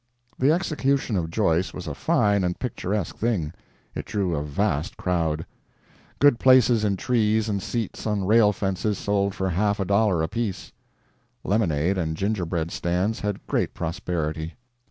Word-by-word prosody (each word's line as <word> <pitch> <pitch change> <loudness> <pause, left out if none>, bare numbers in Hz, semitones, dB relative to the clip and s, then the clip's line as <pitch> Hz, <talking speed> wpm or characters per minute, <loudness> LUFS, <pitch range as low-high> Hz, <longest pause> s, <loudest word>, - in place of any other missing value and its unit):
The 135 +3 +4
execution 140 - 0
of 85 -3 -1
Joyce 90 -1 +1
was 90 - -6
a 75 - -4
fine 100 +7 +2
and 90 0 -1
picturesque 105 -6 -3
thing. 95 -10 -1 0.4
It - - -5
drew 95 -5 -1
a 75 - -1
vast 75 +4 -1
crowd. 80 -3 -1 0.7
Good 145 -4 +5
places 125 -4 +5
in 100 -2 +1
trees 110 -1 +1
and 100 -2 -1
seats 115 +1 -3
on 105 -3 0
rail 105 +1 +5
fences 100 +1 -1
sold 100 -1 0
for 95 0 -1
half 100 +4 +1
a 95 - 0
dollar 100 -3 +2
apiece; 105 +2 -3 0.7
lemonade 95 -3 +1
and 80 -2 -2
gingerbread 90 -5 -1
stands 90 +6 -1
had 105 -2 -3
great - - -1
prosperity. 80 -2 -3
100 Hz, 150 wpm, -24 LUFS, 85-110 Hz, 0.7 s, Good